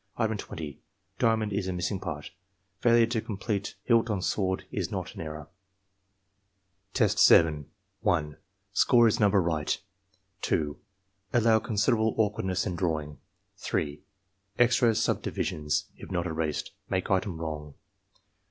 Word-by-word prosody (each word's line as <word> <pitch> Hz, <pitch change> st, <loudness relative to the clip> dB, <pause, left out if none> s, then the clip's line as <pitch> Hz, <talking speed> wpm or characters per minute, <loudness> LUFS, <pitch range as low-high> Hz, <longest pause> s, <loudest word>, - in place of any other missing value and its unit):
Item 110 Hz, -2 st, +1 dB
20. 80 Hz, -8 st, -7 dB, 0.2 s
— 95 Hz, 0 st, -41 dB
Diamond 110 Hz, -3 st, +2 dB
is 100 Hz, -1 st, -1 dB
the 95 Hz, -, -1 dB
missing 90 Hz, +2 st, -2 dB
part. 75 Hz, -5 st, -6 dB, 0.5 s
Failure 115 Hz, +1 st, +5 dB
to 115 Hz, -1 st, -1 dB
complete 100 Hz, -2 st, -3 dB
hilt 115 Hz, -1 st, +3 dB
on 105 Hz, -3 st, 0 dB
sword 95 Hz, 0 st, -1 dB
is -, -, -2 dB
not -, -, -4 dB
an -, -, -7 dB
error. 75 Hz, -2 st, -6 dB, 1.5 s
Test? -, -, +3 dB, 0.8 s
1. 75 Hz, -3 st, 0 dB, 0.4 s
Score 120 Hz, +2 st, +5 dB
is 115 Hz, +2 st, +1 dB
number 105 Hz, -2 st, +4 dB
right. 80 Hz, -4 st, 0 dB, 0.6 s
2. 75 Hz, -2 st, -1 dB, 0.5 s
Allow 115 Hz, -1 st, +4 dB
considerable 110 Hz, +1 st, +1 dB
awkwardness 105 Hz, -4 st, 0 dB
in 90 Hz, -, -2 dB
drawing, 80 Hz, -5 st, -2 dB, 0.4 s
3. 75 Hz, -1 st, -2 dB, 0.6 s
Extra 120 Hz, -1 st, +4 dB
subdivisions, 75 Hz, -8 st, -1 dB
if -, -, -11 dB
not 90 Hz, -1 st, -1 dB
erased, 80 Hz, -3 st, -2 dB, 0.2 s
make 95 Hz, +1 st, -1 dB
item 95 Hz, -3 st, 0 dB
wrong. 75 Hz, -3 st, -5 dB
95 Hz, 125 wpm, -28 LUFS, 80-110 Hz, 1.5 s, Failure